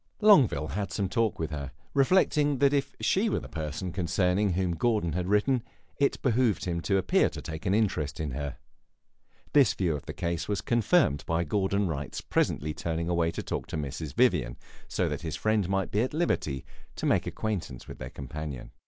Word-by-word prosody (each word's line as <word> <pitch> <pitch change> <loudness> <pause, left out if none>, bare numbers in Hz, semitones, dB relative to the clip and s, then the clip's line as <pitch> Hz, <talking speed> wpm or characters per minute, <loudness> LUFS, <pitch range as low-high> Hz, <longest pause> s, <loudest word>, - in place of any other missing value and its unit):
Longueville 130 - +5
had 100 0 -3
some 100 - -1
talk 115 +2 0
with 80 -1 -3
her, 70 -2 -5 0.2
reflecting 145 -1 +3
that 140 +1 +4
if 140 -1 0
she 210 +4 +2
were - - 0
the - - -9
person 80 +3 -4
concerning 90 +2 +1
whom 90 0 0
Gordon 105 -3 +1
had 90 +1 -2
written 105 +7 +3
him, 115 - -7 0.4
it 140 - +2
behooved 125 -4 +2
him 85 -2 -1
to 95 +3 +1
appear 95 - +3
to - - -8
take 80 +6 -6
an 95 - +3
interest 80 -9 0
in 75 -3 -2
her. 70 +2 -4 1.0
This 140 -7 +5
view 85 -5 0
of 70 - -8
the - - -4
case 85 -1 -2
was 105 -1 -1
confirmed 120 - +2
by 85 +1 +1
Gordon 100 +3 0
Wright's 70 -5 -4
presently 75 +1 0
turning 85 +1 -3
away 85 -1 +2
to - - -4
talk - - -4
with 80 - -2
Mrs. 75 +1 -5
Vivian, 90 - +2 0.3
so - - 0
that - - -3
his 80 -2 -4
friend 110 -4 +1
might 95 -1 0
be 105 - +2
at 130 +4 -2
liberty 75 - -1 0.3
to - - -4
make - - +2
acquaintance 95 - -4
with - - -9
their - - -6
companion. 70 -1 -7
90 Hz, 195 wpm, -28 LUFS, 80-110 Hz, 1.0 s, Longueville